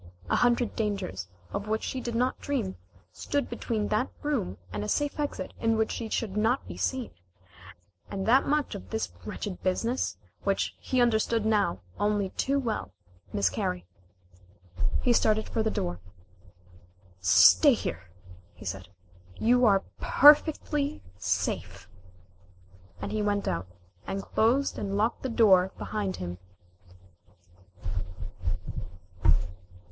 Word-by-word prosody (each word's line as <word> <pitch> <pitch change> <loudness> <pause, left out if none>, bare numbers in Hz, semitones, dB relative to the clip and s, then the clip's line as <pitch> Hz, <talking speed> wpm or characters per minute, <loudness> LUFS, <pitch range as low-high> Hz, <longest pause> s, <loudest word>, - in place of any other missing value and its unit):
A - - +4
hundred 245 -1 +2
dangers, 195 - -2 0.3
of 205 - -3
which 220 +1 -1
she 260 - -3
did 235 -2 -4
not 250 +2 +1
dream, 235 -10 -2 0.4
stood 285 -1 -1
between 225 -3 -2
that 215 +5 +1
room 270 - -1 0.2
and 105 0 -2
a 105 - -3
safe 290 0 0
exit 290 -1 -3
in 225 -1 +2
which 220 0 +1
she 225 -2 -4
should 210 -3 -2
not 225 +5 +1
be - - -7
seen, 260 -3 -2 1.0
and 195 -1 -3
that 250 +5 +4
much 295 0 +1
of 95 0 -8
this 90 -5 -2
wretched 190 -4 -5
business 230 +7 0 0.3
which - - 0
he 260 - -1
understood 225 -1 +2
now 205 - +2 0.2
only 205 -2 +1
too 275 +1 0
well 235 -6 -2 0.4
miscarry. 90 -2 0 1.2
He 245 - +4
started 215 -1 +2
for 225 - -1
the 220 - +1
door. 90 - -2 1.2
"Stay 90 -1 +7
here," 85 +3 -5 0.5
he 100 - -12
said. 95 -1 -5 0.5
"You 245 +2 +4
are 195 -2 +4 0.2
perfectly 295 0 +5 0.2
safe," - - -2 1.1
and - - -4
he 215 - 0
went 205 -1 0
out, 90 0 -1 0.4
and 195 0 -3
closed 250 +6 +1
and 200 0 -2
locked 225 +3 +1
the 260 - -2
door 190 -5 +5
behind 205 -3 -2
him. 90 0 -6
220 Hz, 130 wpm, -28 LUFS, 190-245 Hz, 1.2 s, Stay